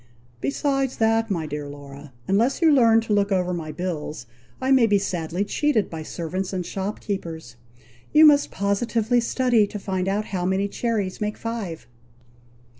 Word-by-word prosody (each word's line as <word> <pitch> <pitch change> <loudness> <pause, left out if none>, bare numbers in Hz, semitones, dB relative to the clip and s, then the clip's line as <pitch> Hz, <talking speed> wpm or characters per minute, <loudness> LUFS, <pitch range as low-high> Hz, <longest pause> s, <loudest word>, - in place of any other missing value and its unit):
"Besides 270 - -1
that, 225 0 +2
my 170 -5 -1
dear 150 -1 -5
Laura! 140 0 -11 0.2
unless 225 +7 +2
you 330 -2 +5
learn 230 -4 +5
to 225 -1 -2
look 200 0 +2
over 180 -1 +1
my 160 -3 -4
bills, 155 -5 -4 0.3
I 260 +1 0
may 255 -4 +6
be 205 -1 +4
sadly 175 0 -2
cheated 280 -2 0
by 160 -1 -5
servants 180 +4 -4
and 180 -2 -2
shop 195 +3 -4
keepers. 165 - -5 0.6
You 310 +1 +7
must 290 -1 +5
positively 225 +4 0
study 235 -2 +2
to 210 - -6
find 190 -2 -2
out 205 +2 0
how 180 -2 -1
many 190 +2 +1
cherries 210 -3 -2
make 210 0 -2
five." 220 -8 -5
200 Hz, 165 wpm, -23 LUFS, 175-230 Hz, 0.6 s, You